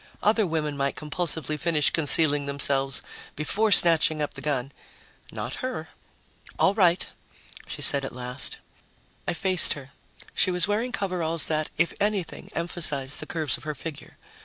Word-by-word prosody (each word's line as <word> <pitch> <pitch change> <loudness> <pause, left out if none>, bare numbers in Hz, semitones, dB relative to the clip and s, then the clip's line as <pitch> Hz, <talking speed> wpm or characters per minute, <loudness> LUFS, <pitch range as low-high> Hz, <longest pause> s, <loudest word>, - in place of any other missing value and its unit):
Other 215 -1 +3
women 155 -3 -2
might 140 0 -1
compulsively 155 -1 -3
finish 165 -3 +2
concealing 145 -2 +4
themselves 140 -1 0 0.3
before 205 +9 0
snatching 165 -4 +6
up 150 - -2
the - - -8
gun. 140 -3 -2 0.6
Not - - -5
her. 255 - -4 0.7
"All 195 - +3
right," 180 -4 +3 0.6
she - - -3
said 140 -1 +4
at 135 - -4
last. 125 +1 -2 0.7
I - - 0
faced 185 0 +3
her. 140 -1 -11 0.4
She - - +2
was 180 0 +3
wearing 220 +5 -1
coveralls 175 -6 -1
that, 155 -1 -1
if 170 +2 +1
anything, 205 -4 -2
emphasized 155 -5 -2
the - - -5
curves 155 -4 -1
of - - -15
her 150 0 -4
figure. 145 +1 -9
160 Hz, 150 wpm, -26 LUFS, 145-180 Hz, 0.7 s, snatching